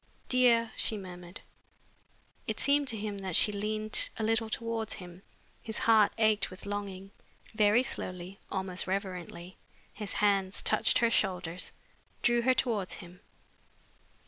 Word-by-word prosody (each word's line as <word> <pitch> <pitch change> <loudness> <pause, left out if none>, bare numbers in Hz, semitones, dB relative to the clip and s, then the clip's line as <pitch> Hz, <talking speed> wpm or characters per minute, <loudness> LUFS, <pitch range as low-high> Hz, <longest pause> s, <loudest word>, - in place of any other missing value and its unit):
"Dear!" 235 -3 +4
she 220 - +1
murmured. 180 0 -9 1.1
It - - -2
seemed 285 0 +3
to 230 -3 +2
him 205 -1 -4
that 190 -3 -3
she 210 - +5
leaned 215 +1 +1
a 225 - -2
little 225 0 +1
towards 225 -1 -2
him. 180 -1 -11 0.4
His 220 -1 -4
heart 220 -2 +4
ached 220 -1 +3
with 185 +1 -11
longing. 200 -1 -5 0.4
Very 215 +3 +4
slowly, 185 -5 -5
almost 190 -1 -3
reverently, 185 -2 -5 0.4
his 210 -2 -4
hands 200 -2 +1
touched - - +3
her 235 -1 +2
shoulders, 180 -5 -1 0.5
drew 240 0 +3
her 255 +2 +3
towards 215 -8 0
him. 175 +1 -12
205 Hz, 135 wpm, -30 LUFS, 185-225 Hz, 1.1 s, she